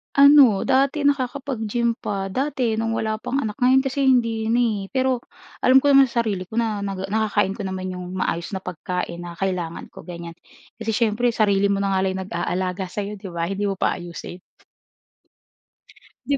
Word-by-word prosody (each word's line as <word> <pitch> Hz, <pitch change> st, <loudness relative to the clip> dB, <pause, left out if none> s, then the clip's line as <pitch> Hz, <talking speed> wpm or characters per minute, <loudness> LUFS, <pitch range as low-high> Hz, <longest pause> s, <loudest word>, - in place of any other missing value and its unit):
Ano, 280 Hz, -7 st, +7 dB
dati 275 Hz, +2 st, +2 dB
nakakapag-gym 250 Hz, -4 st, -1 dB
pa. 195 Hz, -1 st, -3 dB
Dati 255 Hz, -2 st, -1 dB
no'ng 225 Hz, 0 st, -1 dB
wala 215 Hz, -1 st, -2 dB
pang 250 Hz, -, -4 dB
anak, 210 Hz, -1 st, -5 dB
ngayon 260 Hz, +1 st, +4 dB
kasi 270 Hz, 0 st, 0 dB
hindi 230 Hz, -4 st, +2 dB
na 235 Hz, +2 st, +2 dB
eh. 215 Hz, -4 st, 0 dB
Pero 260 Hz, -1 st, +1 dB, 0.4 s
alam 260 Hz, +1 st, +5 dB
ko 285 Hz, -, +4 dB
naman 275 Hz, -1 st, +7 dB
sa 235 Hz, -1 st, 0 dB
sarili 195 Hz, -5 st, -3 dB
ko 220 Hz, -, -9 dB
na 225 Hz, -3 st, 0 dB
naga 195 Hz, -1 st, -4 dB
nakakain 210 Hz, -2 st, +1 dB
ko -, -, -5 dB
naman 185 Hz, 0 st, -4 dB
'yong 180 Hz, 0 st, -7 dB
maayos 170 Hz, +1 st, -2 dB
na 190 Hz, -, -5 dB
pagkain 180 Hz, 0 st, -4 dB
na 175 Hz, -1 st, -8 dB
kailangan 180 Hz, -3 st, -3 dB
ko, -, -, -13 dB
ganyan. 170 Hz, -1 st, -8 dB, 0.4 s
Kasi 225 Hz, 0 st, -2 dB
siyempre 230 Hz, +1 st, +1 dB
sarili 200 Hz, -2 st, +3 dB
mo 200 Hz, 0 st, 0 dB
na 195 Hz, -, 0 dB
nga 190 Hz, -1 st, +1 dB
lang 190 Hz, 0 st, -1 dB
nag-aalaga 185 Hz, +1 st, -3 dB
sa 205 Hz, +3 st, -4 dB
'yo 205 Hz, 0 st, -6 dB
'di 195 Hz, -, -8 dB
ba, 170 Hz, -1 st, -2 dB
hindi 200 Hz, +1 st, -1 dB
mo 195 Hz, -, -1 dB
pa -, -, 0 dB
ayusin? 175 Hz, +1 st, -8 dB, 1.9 s
'Di 280 Hz, -, +1 dB
210 Hz, 185 wpm, -22 LUFS, 190-245 Hz, 1.9 s, Ano